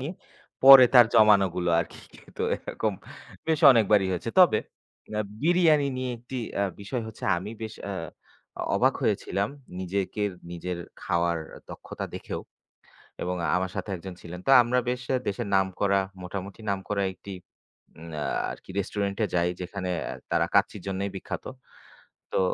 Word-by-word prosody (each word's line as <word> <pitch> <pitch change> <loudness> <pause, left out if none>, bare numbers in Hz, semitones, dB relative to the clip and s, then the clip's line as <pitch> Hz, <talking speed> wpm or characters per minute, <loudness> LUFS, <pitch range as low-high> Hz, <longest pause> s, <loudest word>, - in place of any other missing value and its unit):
নিয়ে 145 +7 -4 0.5
পরে 135 -1 +11
তার 120 -2 +9
জমানোগুলো 100 -5 +4
আরকি - - -7 0.2
খেত। - - -18 0.2
এরকম - - -3 0.5
বেশ 160 -2 +1
অনেকবারই 105 -5 +4
হয়েছে। 90 +6 -3
তবে 175 -12 +7 0.5
অ্যা 105 0 -1 0.2
বিরিয়ানি 160 -4 +4
নিয়ে 130 0 -2
১ 115 - -19
টি 130 - -3 0.2
অ্যা 100 - +1 0.2
বিষয় 115 +5 -4
হচ্ছে, 110 - -9
আমি 95 +5 -5
বেশ 110 0 -5
অ্যা 100 - -4 0.8
অবাক - - +3
হয়েছিলাম 100 +2 0 0.3
নিজের, 100 +2 -2 0.2
নিজের 90 +1 -5 0.2
খাওয়ার 85 -1 0 0.3
দক্ষতা - - -7
দেখেও - - -5 0.8
এবং 90 +1 -2 0.2
আমার 90 0 0
সাথে 100 +1 -4
১ - - -9
জন 95 - -6
ছিলেন। 90 +1 -8
তো - - +5
আমরা 120 +1 +1
বেশ 125 0 -2 0.3
দেশের 105 +2 -2
নামকরা, 95 +1 +2 0.2
মোটামুটি 95 +3 -7
নামক 95 -1 -3 0.3
একটি 100 +2 -9 0.7
উম 85 +1 -10
আ - - -1 0.3
আরকি - - -12
রেস্টুরেন্টে 100 +2 -1
যাই, 85 0 +2
যেখানে 90 +1 -5 0.4
তারা - - +3
কাচ্চির - - +2
জন্যই 95 +1 -2
বিখ্যাত। 95 - -6 0.9
তো - - +2
100 Hz, 145 wpm, -26 LUFS, 95-120 Hz, 0.9 s, পরে